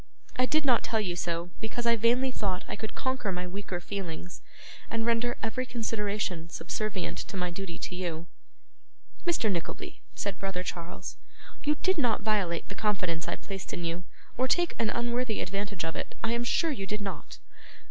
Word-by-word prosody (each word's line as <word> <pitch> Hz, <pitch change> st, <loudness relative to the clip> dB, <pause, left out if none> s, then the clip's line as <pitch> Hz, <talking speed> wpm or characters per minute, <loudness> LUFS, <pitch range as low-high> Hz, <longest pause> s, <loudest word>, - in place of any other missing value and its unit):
I 255 Hz, 0 st, +4 dB
did 310 Hz, +1 st, +3 dB
not 245 Hz, -4 st, +6 dB
tell 225 Hz, -, +2 dB
you 180 Hz, -5 st, 0 dB
so, 170 Hz, 0 st, -1 dB
because 225 Hz, +2 st, -2 dB
I 235 Hz, 0 st, +6 dB
vainly 240 Hz, +4 st, +4 dB
thought 195 Hz, -6 st, 0 dB
I -, -, -2 dB
could 220 Hz, +1 st, -4 dB
conquer 260 Hz, -6 st, 0 dB
my 180 Hz, 0 st, -1 dB
weaker 185 Hz, 0 st, -3 dB
feelings, 180 Hz, -2 st, -4 dB, 0.5 s
and 225 Hz, 0 st, +1 dB
render 235 Hz, +1 st, +3 dB
every 225 Hz, +3 st, +1 dB
consideration 210 Hz, -7 st, -1 dB
subservient 190 Hz, +4 st, -1 dB
to 195 Hz, -, -4 dB
my 180 Hz, -1 st, +1 dB
duty 175 Hz, -1 st, -4 dB
to 180 Hz, -, -3 dB
you.' 170 Hz, -3 st, -2 dB, 1.0 s
'Mr. 275 Hz, -11 st, +4 dB
Nickleby,' 170 Hz, -3 st, -3 dB
said 200 Hz, -2 st, -1 dB
brother 190 Hz, -2 st, -1 dB
Charles, 170 Hz, -1 st, -4 dB, 0.5 s
'you 300 Hz, +1 st, +4 dB
did 375 Hz, -3 st, +4 dB
not 235 Hz, -7 st, +3 dB
violate 200 Hz, -6 st, +2 dB
the -, -, -5 dB
confidence 185 Hz, -6 st, +1 dB
I -, -, +1 dB
placed 195 Hz, -2 st, -5 dB
in 175 Hz, -, -1 dB
you, 170 Hz, +2 st, -1 dB, 0.4 s
or 260 Hz, -, +5 dB
take 345 Hz, +5 st, +4 dB
an 225 Hz, -, +4 dB
unworthy 240 Hz, -1 st, +1 dB
advantage 195 Hz, -2 st, -1 dB
of 165 Hz, -, -1 dB
it. -, -, -3 dB
I 225 Hz, -, +3 dB
am 235 Hz, 0 st, +2 dB
sure 325 Hz, +6 st, +4 dB
you 195 Hz, -9 st, -2 dB
did 210 Hz, +1 st, -1 dB
not. 200 Hz, -1 st, -4 dB
205 Hz, 180 wpm, -31 LUFS, 180-235 Hz, 1.0 s, not